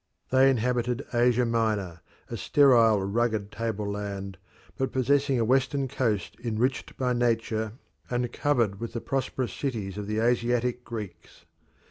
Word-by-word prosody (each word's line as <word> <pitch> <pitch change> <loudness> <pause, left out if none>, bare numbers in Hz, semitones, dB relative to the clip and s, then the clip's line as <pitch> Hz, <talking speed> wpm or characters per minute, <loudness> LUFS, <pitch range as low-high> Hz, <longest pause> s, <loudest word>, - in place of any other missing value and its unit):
They 130 +1 +6
inhabited 125 +1 0
Asia 120 0 +3
Minor, 110 -7 -1 0.3
a - - -5
sterile, 115 -8 +4
rugged 105 0 0
tableland, 100 -3 -4 0.4
but 130 - -1
possessing 135 0 +2
a 115 - +2
western 135 +2 +1
coast 115 -7 -1
enriched 120 +3 -1
by 125 -1 +1
nature 115 -2 0 0.4
and 120 -1 -1
covered 115 -9 +1
with 115 0 -5
the 120 - -2
prosperous 130 -2 -2
cities 105 -8 -3
of 100 - -5
the 105 0 -2
Asiatic 120 +1 +1
Greeks. 105 -9 -8
115 Hz, 130 wpm, -27 LUFS, 105-125 Hz, 0.4 s, They